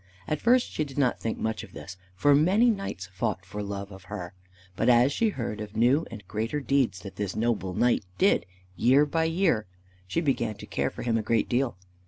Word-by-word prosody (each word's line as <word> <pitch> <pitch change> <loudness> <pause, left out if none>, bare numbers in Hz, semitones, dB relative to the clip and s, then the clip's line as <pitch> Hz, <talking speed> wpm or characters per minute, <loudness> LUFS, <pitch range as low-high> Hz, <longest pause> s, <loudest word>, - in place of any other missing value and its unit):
At 155 - -2
first 245 +1 +3
she 155 - -1
did 140 -2 -9
not 130 -4 +2
think 115 - -3
much 110 0 -2
of - - -13
this, - - -8 0.2
for 145 +10 +4
many 190 +11 +4
knights 195 - -4
fought 100 -1 -2
for 105 +3 -6
love 100 0 -5
of 95 -1 -12
her; 90 -2 -6 0.4
but 115 +5 +2
as 125 +3 +5
she 225 +6 +2
heard 115 - -4
of 105 0 -8
new 130 +8 +3
and 105 -5 -10
greater 115 +9 -2
deeds 135 -9 +1
that 95 - -10
this 100 -2 -3
noble 110 -5 -1
knight 120 -3 +2
did 195 - +3 0.3
year 130 - +5
by 160 +2 0
year, 165 - +1 0.4
she 95 - 0
began 120 -8 0
to - - -10
care - - -1
for - - -8
him 115 -2 +1
a - - -1
great 110 0 +1
deal. 120 -4 0
120 Hz, 215 wpm, -27 LUFS, 105-145 Hz, 0.4 s, as